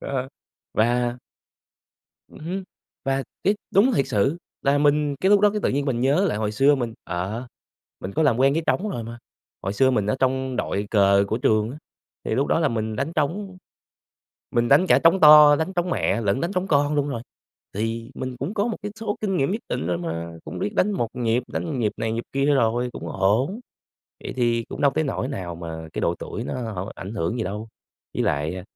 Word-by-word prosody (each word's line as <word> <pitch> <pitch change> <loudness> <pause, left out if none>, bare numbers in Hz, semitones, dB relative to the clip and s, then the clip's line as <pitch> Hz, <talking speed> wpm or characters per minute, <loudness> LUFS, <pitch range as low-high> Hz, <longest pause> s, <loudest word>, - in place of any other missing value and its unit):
Đó, 130 -1 -3 0.5
và 120 +2 +1 1.1
ừm - - -14
hứm, 185 +5 -4 0.4
và 135 0 0 0.2
cái 200 +3 +4 0.2
đúng 235 +7 +5
thiệt 140 -10 +1
sự 120 +11 +1 0.2
là 140 0 +3
mình 145 0 +2
cái 190 - +3
lúc 205 -1 +6
đó 210 - +5
cái 210 0 -2
tự - - +2
nhiên 140 +1 0
mình 125 -4 -1
nhớ 140 +10 +3
lại - - -1
hồi 105 -1 -1
xưa 135 +5 +4
mình, 120 -4 -3
ờ, 95 +8 -4 0.5
mình 95 - -6
có 160 - +1
làm 135 -6 +3
quen 135 +1 +4
với 165 +3 0
trống 215 - +1
rồi 115 -9 -4
mà. 115 +1 -8 0.4
Hồi 95 - -2
xưa 130 +5 +3
mình 105 -5 +1
ở 120 - 0
trong 130 -1 0
đội 100 -3 -2
cờ 100 -1 +4
của 110 - -1
trường 110 -2 +2
á, 145 - -8 0.5
thì - - -1
lúc 140 - +1
đó 165 - +2
là 155 - +3
mình 110 -1 -2
đánh 140 +6 -2
trống, 185 +6 -2 1.0
mình 120 0 +2
đánh 150 +7 +5
cả - - +5
trống 170 +3 +4
to, 150 -2 +9
đánh 160 +4 -2
trống 175 0 -1
mẹ 105 - 0
lẫn 105 +3 0
đánh 170 +3 -1
trống 185 0 -1
con 145 0 +2
luôn 145 -1 +1
rồi. 120 -5 -4 0.5
Thì 115 +3 -3
mình 130 -1 -5
cũng 155 - -3
có 205 +2 0
một 225 - -3
cái 205 - -4
số 210 -2 -2
kinh 195 -3 0
nghiệm 135 +5 +1
nhất 220 +3 -2
định 80 - -2
nên 90 -1 -1
là 85 0 -5
cũng - - -6
biết 205 +3 -2
đánh 210 +3 +2
1 145 - -1
nhịp, 120 0 0
đánh 150 -7 -3
nhịp 105 -3 +1
này, 110 0 -1
nhịp 115 +1 -2
kia 135 0 +1
rồi, 125 -3 +2
cũng - - -7
ổn, 115 - +1 0.7
vậy - - -4
thì 120 -2 +1
cũng - - -7
đâu 140 -1 +4
tới 155 0 +1
nỗi 135 -2 -2
nào 90 -11 -5
mà 80 -1 -7
cái - - -3
độ 85 - +1
tuổi 115 - -5
nó - - -4 0.2
ở 95 +4 -5
ảnh 95 +3 -7
hưởng 95 +3 -1
gì 115 - -2
đâu. 105 +4 -5 0.5
Với - - 0
lại, 75 +5 0
ơ, 90 - -6
130 Hz, 225 wpm, -24 LUFS, 110-155 Hz, 1.1 s, to